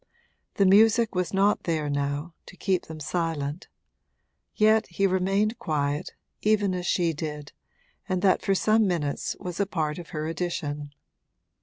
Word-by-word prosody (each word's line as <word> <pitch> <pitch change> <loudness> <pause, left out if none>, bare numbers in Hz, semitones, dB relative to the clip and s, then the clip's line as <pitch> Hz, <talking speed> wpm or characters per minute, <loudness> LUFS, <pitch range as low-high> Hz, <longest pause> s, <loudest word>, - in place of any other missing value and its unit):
The 200 - +3
music 220 +4 +5
was 180 -2 -1
not 200 +2 +2
there 160 -3 0
now, 145 +3 -2
to 185 - -13
keep 185 -1 0
them 160 -1 -8
silent; 155 -1 -3 0.9
yet 215 +1 +4
he 195 +3 0
remained 195 +4 +1
quiet, 145 -6 -2 0.3
even 210 -3 +2
as 180 -1 -3
she 170 -2 +1
did, 150 -1 -6 0.6
and 185 0 -1
that 190 -2 +4
for 195 - +1
some 215 +2 +3
minutes 155 -6 -2
was 180 0 -6
a 200 - +1
part 155 -4 -2
of 170 - -10
her 155 -3 -4
addition. 150 -4 -4
175 Hz, 150 wpm, -26 LUFS, 150-195 Hz, 0.9 s, music